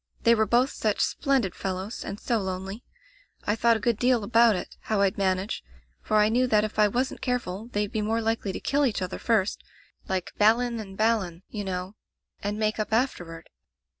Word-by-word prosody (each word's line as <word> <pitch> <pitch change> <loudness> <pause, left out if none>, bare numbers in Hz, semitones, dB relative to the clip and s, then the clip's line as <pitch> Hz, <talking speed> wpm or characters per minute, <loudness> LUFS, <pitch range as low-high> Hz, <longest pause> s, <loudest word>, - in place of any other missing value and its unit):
They 235 - +6
were 220 -1 +2
both 245 +5 +3
such 215 -2 -1
splendid 265 - +1
fellows 190 +3 -4
and 200 +1 -6
so 235 -2 0
lonely. 190 +3 -5 0.6
I 210 - +1
thought 230 0 +3
a - - -7
good 230 0 +1
deal 245 -3 +3
about 230 0 +5
it, 180 - -6
how 215 -2 0
rd 195 -1 +2
manage, 190 - -1 0.4
for 215 - +1
I 210 0 +5
knew 245 +4 +2
that 215 -3 +3
if 215 0 -4
I 210 - +6
wasn't 250 +5 -2
careful 230 -5 -2
they'd 205 -1 -1
be 220 - -1
more 220 +2 0
likely 225 -3 -1
to - - -5
kill 285 +1 +1
each 205 -5 -2
other 180 - -5
first 215 -4 +1 0.2
— - - -29
^like 185 -2 -1
Balin 230 +2 +3
and 195 -3 -8
Balan, 205 -6 0
you 210 -2 -4
know 185 +1 -4 0.2
— - - -53
and 205 +1 -2
make 215 0 0
up 215 - -2
afterward. 175 -9 -2
215 Hz, 205 wpm, -26 LUFS, 195-230 Hz, 0.6 s, They